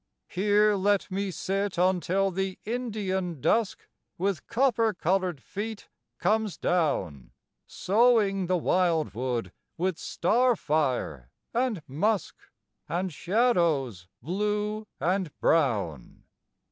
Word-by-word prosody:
Here 210 +2 +3
let 200 0 +1
me 195 +1 -1
sit 195 +1 -2
until 185 +2 +2
the 190 +1 -2
Indian, 205 - -2
Dusk, 220 - 0 0.3
With 195 -1 -2
copper 230 -4 +2
colored 180 -2 0
feet, 215 +1 -6 0.3
comes 215 +1 0
down; 95 - -1 0.3
Sowing 205 -3 +2
the 185 0 +2
wildwood 150 - 0 0.3
with 185 0 -1
star 240 +7 +2
fire 130 - -1 0.2
and 235 -8 0
musk, 200 +9 0 0.5
And 180 0 -2
shadows 165 - +1 0.2
blue 210 - -2
and 180 +1 -1
brown. 105 - 0
190 Hz, 95 wpm, -27 LUFS, 160-210 Hz, 0.5 s, Here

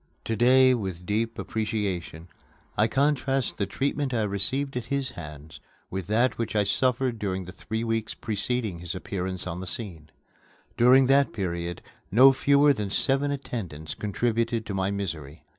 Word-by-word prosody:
To 115 - -1
day, 130 +3 +6
with 95 -7 -4
deep 110 +4 -1
appreciation, 100 -7 -3 0.5
I 105 - +3
contrast 135 0 +1
the 100 - -1
treatment 135 +4 -1
I 110 - +1
received 125 +8 -1
at 125 - -3
his 140 -2 -1
hands 75 -1 -10 0.3
with 95 -2 -4
that 115 +4 +2
which 115 -2 -2
I 105 - +4
suffered 125 +2 +1
during 95 -2 -2
the 90 - -8
three 110 +3 -4
weeks 115 -1 -2
preceding 110 -2 -2
his 90 0 -5
appearance 95 0 -4
on 90 -1 -4
the 95 - -6
scene. 85 -9 -7 0.7
During 130 +3 +6
that 140 +2 +3
period, 85 -4 -3 0.3
no 130 +6 +8
fewer 140 +2 +4
than 105 -5 -3
seven 135 +7 +2
attendants 95 - -5
contributed 115 +2 -1
to 100 - -4
my 95 0 0
misery. 85 -7 -5
110 Hz, 160 wpm, -26 LUFS, 95-130 Hz, 0.7 s, no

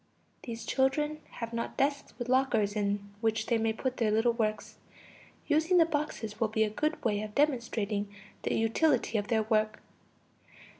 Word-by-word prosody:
(These 230 -1 -6
children 295 +3 +1
have 230 -1 -5
not 230 0 -3
desks 280 +1 -1
with 240 - -4
lockers 245 -5 +2
in 200 -1 -1
which 220 -1 +1
they 235 -2 +1
may 225 0 +1
put 255 +3 -3
their 225 -2 +2
little 225 +3 +3
works. 215 -2 -2 0.7
Using 320 +4 +3
the 330 - +7
boxes 290 -9 -3
will 225 - +2
be 220 0 +1
a 215 - -1
good 305 +8 -1
way 210 -2 +1
of 215 -1 -7
demonstrating 230 -8 0 0.3
the - - -1
utility 230 0 +2
of 205 - -4
their 225 -2 +2
work.) 215 -1 +1
230 Hz, 165 wpm, -30 LUFS, 215-265 Hz, 0.7 s, the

